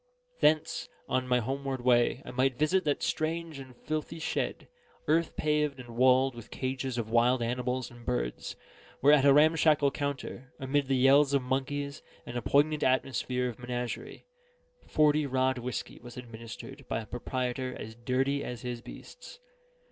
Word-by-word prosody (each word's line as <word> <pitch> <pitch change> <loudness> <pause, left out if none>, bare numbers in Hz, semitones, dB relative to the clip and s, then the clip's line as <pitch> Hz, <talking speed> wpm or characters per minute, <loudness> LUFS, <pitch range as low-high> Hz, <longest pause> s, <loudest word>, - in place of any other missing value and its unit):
Thence, 155 0 +2 0.2
on 130 0 0
my 125 0 +3
homeward 135 +1 -3
way, 120 -1 +3
I - - -7
might 130 0 +1
visit 180 +4 +2
that 145 -1 0
strange 160 -1 -2
and 130 -2 -11
filthy 155 +1 -4
shed, 160 - -2 0.4
earth 165 +2 +2
paved 150 -2 0
and 125 -1 -10
walled 130 +2 +4
with 120 -2 -10
the - - -10
cages 130 -1 -2
of 110 -2 -3
wild 120 +1 +3
animals 125 +1 -2
and 120 0 -13
birds, - - -3 0.5
where 145 +2 +7
at 140 -2 +5
a 140 - +8
ramshackle 150 -1 +5
counter, 135 -3 -5
amid 135 +1 0
the 135 -1 +2
yells 140 +2 +5
of 135 - +2
monkeys, 140 +2 -2 0.2
and 120 - -7
a 120 - -1
poignant 150 +3 +2
atmosphere 130 -1 +1
of 120 -1 -6
menagerie, 120 0 -5 0.6
forty 150 -1 +3
rod 130 -1 +1
whiskey 125 +1 -5
was 120 0 -11
administered 120 +3 -9
by 110 - -1
a - - -9
proprietor 125 +2 -3
as 110 - -7
dirty 130 +4 0
as 125 0 -6
his 120 -1 -4
beasts. - - -11
130 Hz, 165 wpm, -30 LUFS, 125-145 Hz, 0.6 s, a